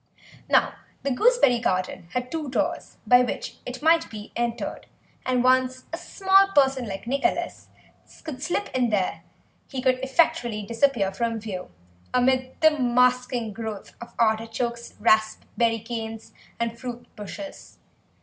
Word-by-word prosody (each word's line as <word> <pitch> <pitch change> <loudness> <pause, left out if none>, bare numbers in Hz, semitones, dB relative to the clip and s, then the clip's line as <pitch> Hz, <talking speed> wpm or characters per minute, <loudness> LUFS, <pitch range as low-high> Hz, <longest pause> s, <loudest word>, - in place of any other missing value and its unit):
Now - - +4 0.3
the 280 - 0
gooseberry 280 - +4
garden 185 -3 -1
had 250 0 -2
two 315 -4 -3
doors - - -2
by 245 0 +7
which 250 - -3
it 255 +3 -6
might 330 +1 +4
be 215 -1 -9
entered, 235 0 -3 0.4
and 250 -1 +2
once 255 0 +3
a - - -1
small 390 +1 +4
person 265 -3 +3
like 195 +1 -6
Nicholas 280 +8 -1 0.6
could 295 -5 -7
slip 380 +6 -1
in 250 -2 +2
there 200 -4 0 0.5
he 265 - -5
could 255 0 +2
effectually 245 -6 +1
disappear 230 -2 +1
from 230 +2 -1
view 195 -4 -6 0.5
amid 255 +1 +1
the 315 0 +7
masking 250 -3 +2
growth 220 -2 -6
of 235 0 -10
artichokes, 230 +1 -1
raspberry 220 +1 +2
canes, 225 0 -6 0.3
and 235 0 -2
fruit 245 -1 -6
bushes. 230 +8 -9
245 Hz, 135 wpm, -25 LUFS, 225-265 Hz, 0.6 s, by